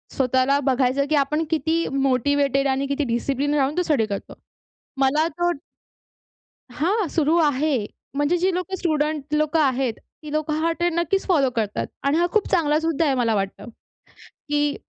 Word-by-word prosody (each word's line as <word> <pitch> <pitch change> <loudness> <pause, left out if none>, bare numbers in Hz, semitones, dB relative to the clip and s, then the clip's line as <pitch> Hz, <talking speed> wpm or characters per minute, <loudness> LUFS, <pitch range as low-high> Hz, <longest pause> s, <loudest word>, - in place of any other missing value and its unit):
स्वतःला 260 +2 +2
बघायचं 265 +1 +1
की 310 - +2
आपण 300 +3 +1
किती 320 +1 0
मोटिवेटेड 275 +1 +1
आणि 270 +1 0
किती 280 +1 -1
डिसिप्लिन 275 +4 -1
राहून 280 +3 0
तो - - +3
स्टडी 285 -10 +1
करतो. 200 -2 -6 0.6
मला 280 +4 +2
तो 350 +2 -1 1.2
हां, 370 - 0
सुरू 315 0 +1
आहे. 290 -5 +1 0.3
म्हणजे 290 +5 +1
जी 370 +1 +1
लोकं 365 +2 -3
स्टुडंट 305 -4 -1
लोकं 305 +1 +1
आहेत. 260 -4 +1 0.3
ती 300 - -7
लोकं 310 0 -1
हा 330 +1 +1
ट्रेंड 345 0 -1
नक्कीच 385 +4 0
फॉलो 285 -8 +3
करतात. 215 -2 -2 0.2
आणि 280 +3 +2
हा 350 +1 +2
खूप 430 - +2
चांगला 305 -4 +2
सुद्धा 325 0 0
आहे 275 -2 +2
मला 230 -3 +1
वाटतं. 195 +3 -4 0.8
की 295 0 +1
290 Hz, 160 wpm, -23 LUFS, 270-325 Hz, 1.2 s, तो